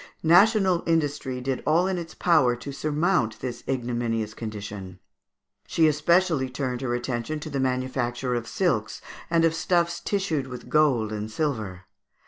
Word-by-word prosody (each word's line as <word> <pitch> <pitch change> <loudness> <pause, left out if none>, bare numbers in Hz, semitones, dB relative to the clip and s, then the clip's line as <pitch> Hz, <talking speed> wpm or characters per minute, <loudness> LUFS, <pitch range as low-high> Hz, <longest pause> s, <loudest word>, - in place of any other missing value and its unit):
National 185 +1 +5
industry 145 -5 0
did 130 0 -2
all 165 +4 +3
in 190 -1 -1
its 165 -1 -8
power 155 -9 +3
to 125 +4 -7
surmount 150 - 0
this 120 -2 -5
ignominious 120 -4 -2
condition; 100 -4 -7 0.7
she 160 -2 +4
specially 155 -2 +2
turned 125 -1 -3
her 120 -2 -1
attention 120 +5 -3
to 155 - -6
the 140 - -2
manufacture 130 -1 -1
of 120 -1 -2
silks 125 - 0 0.3
and 165 -1 +3
of 165 - +3
stuffs 170 0 +1
tissued 170 -9 -1
with 125 -1 -9
gold 135 -8 +3
and 105 0 -4
silver. 110 - -2
135 Hz, 145 wpm, -25 LUFS, 120-165 Hz, 0.7 s, National